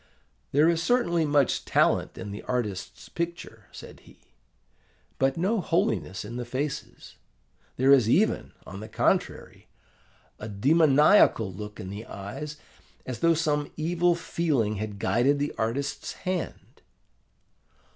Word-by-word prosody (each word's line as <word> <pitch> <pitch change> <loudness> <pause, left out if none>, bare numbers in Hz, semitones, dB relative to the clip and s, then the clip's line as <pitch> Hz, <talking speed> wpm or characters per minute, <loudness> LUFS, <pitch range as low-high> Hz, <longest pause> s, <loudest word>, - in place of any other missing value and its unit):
'There 150 +3 +4
is 165 -1 +2
certainly 170 -6 +2
much 145 -3 +2
talent - - +1
in 100 - -6
this 100 - -7
artist's 110 -7 -3
picture,' 170 0 -6
said - - -11
he, - - -19 1.0
'but 135 +2 +1
no 195 +5 +1
holiness 105 - -1
in 120 +3 -7
the 125 - -3
faces: 135 +4 -5 0.6
there 130 +2 +4
is 125 -5 +5
even, 205 - +2
on 100 - -8
the 110 +2 -9
contrary, - - -1 0.7
a 105 - -6
demoniacal 145 - +4
look 105 +2 -8
in 95 - -6
the 105 +3 -8
eyes, 125 +10 -7 0.5
as 125 -3 -5
though 165 +4 +3
some 150 -2 -1
evil 175 +2 +1
feeling 140 -11 -1
had 105 0 -5
guided 125 +8 +2
the 145 +1 -2
artist's 120 +6 -2
hand. 185 -2 -5
140 Hz, 130 wpm, -26 LUFS, 110-165 Hz, 1.0 s, is